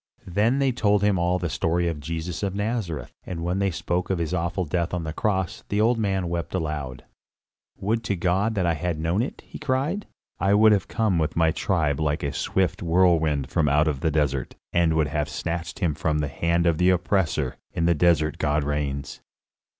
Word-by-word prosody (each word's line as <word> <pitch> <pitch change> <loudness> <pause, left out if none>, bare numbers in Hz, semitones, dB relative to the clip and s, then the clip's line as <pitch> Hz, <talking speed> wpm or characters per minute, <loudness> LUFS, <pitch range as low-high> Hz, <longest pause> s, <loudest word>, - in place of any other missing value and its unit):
Then 105 +8 +1
they 135 -1 +2
told 105 -4 +2
him 100 -3 +3
all 90 +1 +2
the 90 -1 -2
story 85 +2 0
of 80 -3 -2
Jesus 80 +3 -4
of 100 -2 -2
Nazareth; 105 -6 -2
and 85 -3 -5
when 90 +3 -1
they 100 0 +2
spoke 90 +1 -2
of 95 - +1
his 85 0 -2
awful 90 +1 -1
death 85 +2 -1
on 85 - -3
the 80 -1 -4
cross, 95 -2 -1
the 100 - 0
old 115 +2 +3
man 95 -4 0
wept 85 +1 -3
aloud. 75 -7 -3 0.7
"Would 110 +4 -1
to 100 - 0
God 95 +5 +1
that 95 -3 +1
I 85 - +2
had 85 +1 -2
known 85 +6 0
it!" 130 - -5
he - - -10
cried; 150 +8 -1 0.3
"I 95 +3 +3
would 110 +1 +6
have 100 -3 +2
come 105 -6 +1
with 80 -1 -1
my 80 -1 +3
tribe 80 -5 0
like 75 0 0
a 70 - -2
swift 95 -1 0
whirlwind 80 -5 +2
from 80 -4 +2
out 75 +2 +3 0.2
the 80 - +2
desert, 70 -4 -1 0.2
and 85 -2 +3
would 80 -2 +2
have 75 0 -1
snatched 85 -1 -4
him 85 -6 0
from 75 +1 -1
the 75 -2 -1
hand 85 +4 0
of 85 -2 +2
the 90 +1 +4
oppressor. 90 -7 +1
In 85 - -1
the 85 - +4
desert 80 -2 +2
God 75 0 +1
reigns." 70 -1 -3
85 Hz, 205 wpm, -25 LUFS, 80-95 Hz, 0.7 s, would